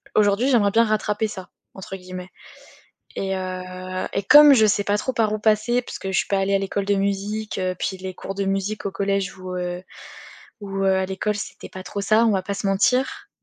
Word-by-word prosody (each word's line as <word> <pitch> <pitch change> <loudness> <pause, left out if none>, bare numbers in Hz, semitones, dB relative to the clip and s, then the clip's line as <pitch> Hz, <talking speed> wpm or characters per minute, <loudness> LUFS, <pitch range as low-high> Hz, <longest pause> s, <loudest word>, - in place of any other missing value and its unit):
aujourd'hui, 210 +5 +3
j'aimerais 210 -6 +3
bien 230 +2 +5
«rattraper 215 0 0
ça» 190 -3 -9 0.3
entre 190 0 -7
guillemets 185 0 -9 0.9
et 195 0 -1
heu, 185 0 -5
et 195 - -1
comme 295 +6 +9
je 220 -4 +5
sais 205 0 +2
pas 205 0 +1
trop 260 - -2
par 220 -3 +1
où 215 - -2
passer, 220 +3 +2
parce - - -8
que 190 - -4
je 185 - 0
suis - - -1
pas 200 - +1
allée 195 +1 +1
à - - +2
l'école 195 0 -2
de 205 - +2
musique, 200 +2 -2
heu, 185 0 -1
puis 190 +1 -2
les 185 0 -6
cours 195 - -6
de 195 0 -1
musique 195 +2 -2
au 200 - -1
collège 195 0 -1
ou, 185 0 -6
heu, 180 0 -4 0.8
ou, 195 -1 -4
heu, 190 - +4
à 190 0 0
l'école, 200 +2 -2
c'était 205 - -7
pas 185 - -8
trop 200 - -5
ça. 215 +3 +4
On 220 - +3
va 190 -2 0
pas 200 - -4
se 200 - -3
mentir. 230 +7 +1
195 Hz, 230 wpm, -23 LUFS, 190-215 Hz, 0.9 s, comme